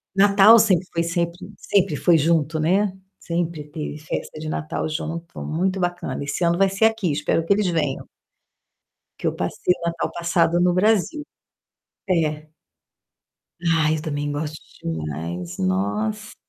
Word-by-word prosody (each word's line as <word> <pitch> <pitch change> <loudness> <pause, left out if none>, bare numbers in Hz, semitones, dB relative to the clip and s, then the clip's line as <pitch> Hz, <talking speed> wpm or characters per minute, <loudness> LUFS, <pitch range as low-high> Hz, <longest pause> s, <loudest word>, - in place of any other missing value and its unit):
Natal 200 +3 +7
sempre 190 -5 +3
foi 170 - +1
sempre 170 0 -1 0.2
sempre 195 -5 +1
foi 170 +3 +4
junto, 160 0 +1
né, 190 +6 +2 0.3
sempre 170 -2 -3
teve 150 0 -6
festa 155 0 -5
de 155 - -5
Natal 155 0 -3
junto, 165 +2 -5
muito 185 +4 -1
bacana. 175 -7 -2
Esse 145 +5 -3
ano 170 0 +3
vai 195 +1 +4
ser 195 +3 +2
aqui; 220 -6 +1
espero 150 +3 0
que 200 - +4
eles 205 -1 +1
venham. 155 -6 -1 1.1
Que - - -1
eu - - -1
passei 180 - 0
o - - -18
Natal 170 0 -2
passado 170 0 +1
no 180 0 +3
Brasil. 220 - +1 0.8
É. 155 -3 0 1.1
Ai, 165 -2 +2
eu - - -5
também 145 -2 -3
gosto 150 +1 -4 0.2
demais, 80 +2 -4
nossa! 100 +3 -1
165 Hz, 145 wpm, -22 LUFS, 150-180 Hz, 1.1 s, Natal